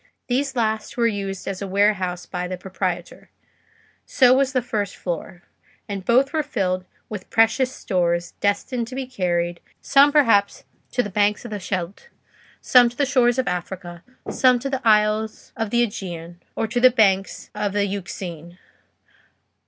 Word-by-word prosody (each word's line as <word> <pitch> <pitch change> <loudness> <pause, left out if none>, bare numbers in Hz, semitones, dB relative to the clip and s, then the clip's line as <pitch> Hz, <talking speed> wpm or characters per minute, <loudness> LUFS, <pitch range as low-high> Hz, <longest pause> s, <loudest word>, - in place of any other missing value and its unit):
These 270 +2 -1
last 220 -2 -1
were 235 - +2
used 195 -4 -2
as 195 -1 -4
a 200 - -3
warehouse 190 -2 +1
by 180 -1 -4
the 185 0 -5
proprietor; 180 -1 -5 0.7
so 255 -1 +4
was 265 0 +2
the 255 -2 0
first 210 -5 -3
floor; 175 0 -5 0.4
and 200 -2 -5
both 260 - +3
were 315 - +2
filled 185 -8 -2 0.2
with 210 -4 -8
precious 225 +3 +3
stores, 175 -5 -1
destined 225 +4 -1
to 255 - -8
be 265 0 -3
carried, 175 -8 -1 0.2
some 280 +1 +5
perhaps 230 -9 +3 0.3
to 245 - +2
the 205 - -6
banks 210 +3 +1
of 235 - -7
the 210 - -4
Scheldt, 185 - -5 0.5
some 245 -2 +6
to 240 - -16
the 285 - +2
shores 250 -3 +3
of 260 - 0
Africa, 175 -1 -5 0.2
some 255 -1 +3
to 275 +3 -4
the 265 -1 -2
isles 215 0 +1
of 225 -1 -2
the 240 +2 +3
Aegean, 175 -5 -6
or - - 0
to 235 +3 -1
the 255 +1 +7
banks 200 -5 +1
of 205 -1 -2
the 205 0 +1
Euxine. 175 -3 -6
205 Hz, 165 wpm, -22 LUFS, 185-245 Hz, 0.7 s, the